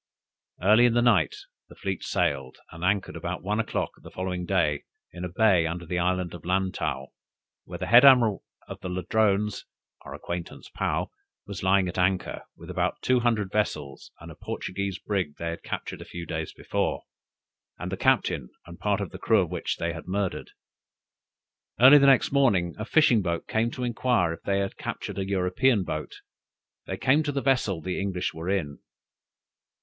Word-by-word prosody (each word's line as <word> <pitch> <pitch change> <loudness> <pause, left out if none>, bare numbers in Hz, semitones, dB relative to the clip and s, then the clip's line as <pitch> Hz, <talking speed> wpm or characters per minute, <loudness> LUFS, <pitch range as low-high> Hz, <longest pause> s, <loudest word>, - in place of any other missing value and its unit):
Early 110 +5 +6
in 120 - 0
the 120 - +4
night 105 -10 +3 0.3
the - - -14
fleet 95 -2 -4
sailed, 65 -1 -1
and 80 +1 -9
anchored 100 +1 0
about - - -5
one 105 +3 -1
o'clock 115 - -1
the - - -11
following 90 -1 -4
day 85 -7 +1 0.3
in 90 - -7
a 90 - -3
bay 90 -3 +3
under 85 +1 -5
the 90 +2 -2
island 90 0 0
of 85 - -9
Lantow, 90 -7 -1 0.6
where - - -7
the - - -4
head 120 +7 +7
admiral 120 -7 +6 0.2
of - - -9
Ladrones 100 +3 0 0.4
(our - - -9
acquaintance 85 -1 -7
Paou) - - -1 0.3
was 100 -3 -7
lying 95 0 +3
at 90 +1 -4
anchor, 90 0 0 0.2
with - - -9
about - - -1
two 130 -1 +3
hundred 110 -5 0
vessels 75 -10 -2
and - - -10
a - - -11
Portuguese 100 0 -4
brig 95 -6 -2
they 85 - -3
had 85 - -7
captured - - -5
a - - -8
few 85 -1 -7
days 80 -1 -4
before, - - -2 0.7
and - - -5
the - - -1
captain 60 -4 +1 0.2
and 85 0 -12
part 105 -1 0
of 100 - -4
the - - -9
crew 110 -3 +3
of 85 - -3
which - - -2
they 85 0 -2
had 85 - -9
murdered. 95 0 -2 1.3
Early 135 +4 +9
the 140 - +5
next 135 -3 +4
morning, 100 -12 +2
a 110 - -3
fishing 125 -6 +4
boat 85 -3 -3
came 110 +1 +1
to 125 - -6
inquire 120 -7 +1
if 85 - -10
they 100 0 0
had 95 - -4
captured 100 - -5
an 95 - -2
European 100 +4 +2
boat; 75 -3 -6 0.7
they 95 - -4
came 135 +8 +3
to 150 -2 -2
the 140 - -1
vessel 120 -10 +1
the 90 +4 -3
English 95 -2 -2
were 80 +3 -5
in. 80 -8 -2
95 Hz, 185 wpm, -26 LUFS, 85-110 Hz, 1.3 s, Early